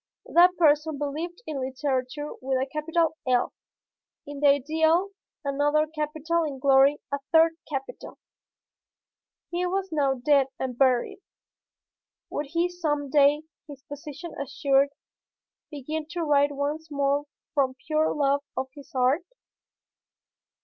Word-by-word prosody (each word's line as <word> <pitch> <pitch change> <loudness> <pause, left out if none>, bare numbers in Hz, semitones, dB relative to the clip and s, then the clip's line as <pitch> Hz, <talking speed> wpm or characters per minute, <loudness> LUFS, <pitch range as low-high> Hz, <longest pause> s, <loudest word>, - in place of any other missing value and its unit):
That 360 +2 +5
person 300 -2 +3
believed 315 - -4
in 300 -3 -4
Literature 260 +1 -2
with 265 0 0
a 260 - 0
capital 320 +2 0
"L;" 250 -1 +2 0.7
in 290 0 -8
the 290 - +4
Ideal, 315 +6 +3 0.4
another 290 +2 +2
capital; 310 +2 -2
in 290 -4 -4
Glory, 275 +1 +5
a 280 - -1
third 325 0 +6 0.2
capital. 270 -3 -6 1.3
He 350 +1 -1
was 385 +1 -2
now 280 -3 +1
dead 270 +1 +3
and 255 -2 -3
buried. 255 +4 +2 1.1
Would 295 - -3
he 335 +4 +1
some 300 -6 -2
day, 290 +1 +4 0.2
his 280 -2 -11
position 295 +3 -8
assured, 275 0 +2 0.8
begin 305 +1 -5
to 345 -1 -2
write 290 -1 +3
once 295 +3 -3
more 285 0 0 0.3
from 270 -3 +1
pure 310 0 +1
love 285 -1 +1 0.2
of 260 0 -2
his 285 -2 -14
art? 255 +5 +3
290 Hz, 125 wpm, -26 LUFS, 275-315 Hz, 1.3 s, third